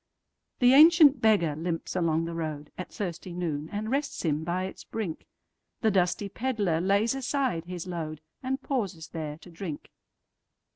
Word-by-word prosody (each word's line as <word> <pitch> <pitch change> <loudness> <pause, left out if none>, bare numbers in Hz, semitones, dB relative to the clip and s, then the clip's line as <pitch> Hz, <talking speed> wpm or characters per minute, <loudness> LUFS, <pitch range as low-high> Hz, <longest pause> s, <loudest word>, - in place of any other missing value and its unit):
The 245 0 +5
ancient 305 -1 +8
beggar 195 -9 +3
limps 165 +2 -3
along 165 -2 +1
the 165 - -4
roadAt 155 +1 -5
thirsty 175 -2 -5
noon, 160 -4 -3
and 215 +2 -3
rests 280 -6 -1
him 155 -1 +1
by 175 +3 -1
its 190 - -6
brink; 200 -8 -5 0.5
The 220 - +3
dusty 185 +1 +1
pedlar 205 -8 0
lays 200 +5 +2
aside 270 - -1
his 175 -1 -6
load, 160 -4 -4 0.2
And 265 +1 -2
pauses 195 - -2
there 155 -3 -5
to 175 +2 -15
drink. 165 -3 -7
180 Hz, 150 wpm, -28 LUFS, 165-225 Hz, 0.5 s, ancient